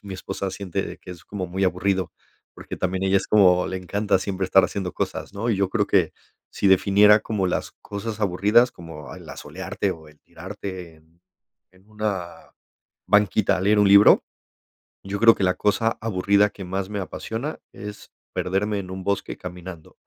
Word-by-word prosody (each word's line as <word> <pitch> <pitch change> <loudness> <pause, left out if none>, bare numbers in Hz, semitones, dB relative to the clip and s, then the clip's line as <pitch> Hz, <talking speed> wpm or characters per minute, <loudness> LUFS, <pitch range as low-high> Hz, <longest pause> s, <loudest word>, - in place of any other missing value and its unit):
mi 100 -2 -7
esposa 95 +1 -4
siente 95 0 -3
de - - -7
que 90 - -12
es 85 -2 -10
como 95 -3 -5
muy 95 +2 -1
aburrido, 95 0 0 0.4
porque - - -8
también 95 0 -1
ella 95 0 +4
es - - -6
como 90 -4 +4
le 95 - -3
encanta 100 +2 0
siempre 95 -1 -3
estar 95 +1 +5
haciendo 95 -3 -3
cosas, - - -4
¿no? 115 +4 -1
Y 105 - +1
yo 100 -1 +1
creo 105 0 0
que 90 -5 +2 0.4
sí 100 - -1
definiera 100 +2 +6
como 105 -4 -1
las 90 - -2
cosas 105 +2 -6
aburridas, 105 +6 +3
como 80 -4 -10
el - - -12
asolearte - - -4
o 80 -1 -9
el 75 - -20
tirarte 90 -4 -8
en 80 +2 -28 0.5
en 95 +3 -25
una 105 -5 -5 0.5
banquita 105 -1 +3
a - - -3
leer 105 +2 +3
un 105 - +5
libro, 100 +1 +7 0.8
yo 100 +2 -4
creo 115 0 +7
que 95 - 0
la 90 - +2
cosa 115 +2 +1
aburrida 100 -1 +2
que 95 - -9
más 95 +1 -3
me 105 -1 -4
apasiona 115 - -5
es 105 +1 -9 0.2
perderme 100 +2 -1
en 95 -1 -9
un 95 0 -6
bosque 100 -1 -2
caminando. 90 -2 -10
95 Hz, 180 wpm, -23 LUFS, 90-105 Hz, 0.8 s, libro